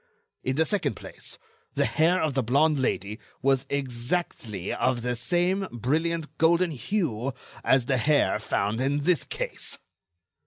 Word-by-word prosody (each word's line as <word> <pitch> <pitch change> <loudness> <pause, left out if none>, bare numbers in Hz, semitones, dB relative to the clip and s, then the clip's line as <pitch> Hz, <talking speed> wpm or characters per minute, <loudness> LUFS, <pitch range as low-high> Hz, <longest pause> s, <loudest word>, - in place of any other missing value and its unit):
In 130 - 0
the 160 +2 +3
second 205 +2 0
place, - - -8 0.4
the - - +3
hair 170 +3 +3
of 155 -3 +1
the 135 - +2
blonde 140 +5 +3
Lady 105 -3 -1 0.2
was 135 0 +2
exactly 120 - -2
of 130 -2 0
the 125 0 0
same 180 +9 +1
brilliant 155 +7 -1
golden 170 +2 +4
hue 135 - -1 0.3
as 130 -2 +4
the 130 +1 +2
hair 145 +5 +3
found 105 +4 -1
in 140 +2 +1
this 170 +2 +2
case." - - -4
140 Hz, 145 wpm, -27 LUFS, 125-165 Hz, 0.4 s, golden